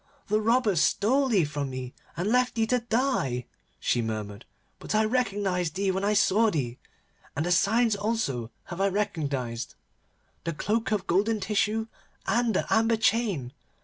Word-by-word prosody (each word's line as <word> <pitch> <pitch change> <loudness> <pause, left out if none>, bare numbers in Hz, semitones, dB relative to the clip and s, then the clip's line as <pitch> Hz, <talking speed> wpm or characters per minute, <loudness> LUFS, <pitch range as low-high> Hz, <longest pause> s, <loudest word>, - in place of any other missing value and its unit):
'The 215 +1 +2
robbers 220 -6 +3
stole 265 +7 +2
thee 200 -10 +3
from 145 -2 -3
me, 130 -1 -6 0.2
and 185 +5 0
left 250 0 +2
thee 225 -1 +2
to 250 +2 +1
die,' 225 - 0 0.3
she 120 - +1
murmured, 105 -2 -5 0.3
'but - - -3
I 215 0 +4
recognised 200 -8 0
thee 195 0 +1
when 190 +1 -2
I 205 +1 +2
saw 215 +2 +4
thee, 130 - -3 0.6
and 155 - -1
the 175 - 0
signs 220 +5 +3
also 200 - -1
have 180 +1 -6
I 195 - +4
recognised, 145 - -2 0.7
the 165 - -2
cloak 220 +8 -1
of 205 -4 0
golden 210 +5 +1
tissue 210 +3 0 0.4
and 235 -3 +1
the - - +1
amber 225 0 +3
chain. 200 - +1
200 Hz, 160 wpm, -27 LUFS, 150-225 Hz, 0.7 s, I